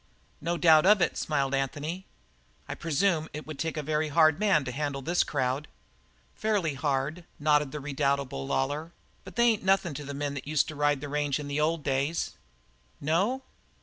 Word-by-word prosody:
"No 170 Hz, +1 st, -1 dB
doubt 165 Hz, 0 st, +6 dB
of 210 Hz, 0 st, +7 dB
it," 175 Hz, -, +1 dB
smiled 140 Hz, -3 st, -1 dB
Anthony. 145 Hz, +7 st, -2 dB, 0.6 s
"I -, -, -4 dB
presume 165 Hz, 0 st, 0 dB
it 150 Hz, +1 st, -6 dB
would 155 Hz, -2 st, -8 dB
take 160 Hz, -1 st, -2 dB
a 150 Hz, -, -2 dB
very 155 Hz, +1 st, 0 dB
hard 155 Hz, +1 st, +4 dB
man 195 Hz, -9 st, +3 dB
to 125 Hz, -, -3 dB
handle 140 Hz, 0 st, -3 dB
this 175 Hz, +5 st, +2 dB
crowd." 135 Hz, +1 st, -1 dB, 0.7 s
"Fairly 205 Hz, -8 st, 0 dB
hard," 140 Hz, +5 st, -1 dB
nodded 150 Hz, -2 st, +2 dB
the 150 Hz, -, -5 dB
redoubtable 140 Hz, -, -1 dB
Lawlor, 145 Hz, +5 st, -1 dB, 0.3 s
"but -, -, -11 dB
they 235 Hz, -, +3 dB
ain't 225 Hz, -3 st, +3 dB
nothin' 190 Hz, -4 st, +2 dB
to 150 Hz, -, -6 dB
the 140 Hz, 0 st, -6 dB
men 145 Hz, 0 st, -2 dB
that 135 Hz, -1 st, -7 dB
used 150 Hz, -1 st, +2 dB
to 155 Hz, -, -7 dB
ride 145 Hz, -1 st, +1 dB
the 145 Hz, -, -5 dB
range 145 Hz, -1 st, 0 dB
in 145 Hz, -1 st, -6 dB
the 145 Hz, +1 st, -1 dB
old 160 Hz, 0 st, 0 dB
days." 140 Hz, +4 st, 0 dB, 0.7 s
"No?" 195 Hz, -, 0 dB
150 Hz, 185 wpm, -28 LUFS, 140-165 Hz, 0.7 s, of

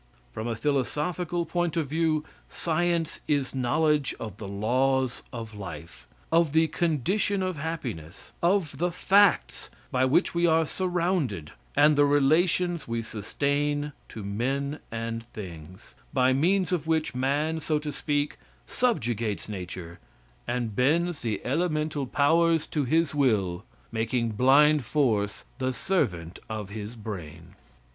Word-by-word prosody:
From 110 Hz, -, -4 dB
a 115 Hz, -, -1 dB
philosophical 150 Hz, +7 st, -1 dB
point 175 Hz, -1 st, -1 dB
of 160 Hz, -, +1 dB
view, 155 Hz, 0 st, +1 dB, 0.2 s
science 170 Hz, 0 st, 0 dB
is 140 Hz, -3 st, 0 dB
knowledge 145 Hz, +2 st, +1 dB
of 105 Hz, -3 st, -6 dB
the 105 Hz, -, -7 dB
laws 125 Hz, +5 st, +1 dB
of 115 Hz, -2 st, -7 dB
life; 95 Hz, -5 st, -9 dB, 0.2 s
of 165 Hz, -3 st, +3 dB
the 160 Hz, 0 st, +4 dB
condition 180 Hz, -, 0 dB
of 185 Hz, -3 st, -2 dB
happiness; 125 Hz, -, -6 dB
of 170 Hz, -6 st, +1 dB
the 175 Hz, +1 st, +1 dB
facts 200 Hz, +2 st, +3 dB, 0.2 s
by 130 Hz, 0 st, +3 dB
which 140 Hz, +8 st, +2 dB
we 170 Hz, 0 st, +3 dB
are 160 Hz, 0 st, +4 dB
surrounded, 170 Hz, -, -1 dB, 0.2 s
and 150 Hz, +1 st, +6 dB
the 145 Hz, 0 st, +5 dB
relations 160 Hz, +4 st, +2 dB
we 115 Hz, 0 st, -2 dB
sustain 145 Hz, +7 st, -1 dB, 0.2 s
to 110 Hz, -, -7 dB
men 135 Hz, +8 st, -2 dB
and 115 Hz, +1 st, -4 dB
things 90 Hz, -1 st, -9 dB, 0.2 s
by 130 Hz, -2 st, +4 dB
means 180 Hz, +7 st, +2 dB
of 165 Hz, -4 st, -1 dB
which 160 Hz, -2 st, +1 dB
man, 145 Hz, +5 st, 0 dB
so 155 Hz, 0 st, 0 dB
to 150 Hz, 0 st, -4 dB
speak, 145 Hz, 0 st, -1 dB, 0.3 s
subjugates 115 Hz, -, -1 dB
nature 90 Hz, -4 st, -7 dB, 0.5 s
and 120 Hz, -3 st, -2 dB
bends 160 Hz, +6 st, +2 dB
the 110 Hz, -4 st, -1 dB
elemental 155 Hz, -1 st, 0 dB
powers 165 Hz, +4 st, +3 dB
to 150 Hz, -3 st, -1 dB
his 160 Hz, +3 st, +2 dB
will, 105 Hz, -10 st, +1 dB, 0.3 s
making 115 Hz, +1 st, 0 dB
blind 140 Hz, +6 st, +5 dB
force 110 Hz, -7 st, 0 dB
the 130 Hz, 0 st, 0 dB
servant 90 Hz, -, -1 dB
of 105 Hz, -3 st, -4 dB
his 105 Hz, +2 st, -6 dB
brain. 90 Hz, -6 st, -8 dB
140 Hz, 135 wpm, -27 LUFS, 115-160 Hz, 0.5 s, and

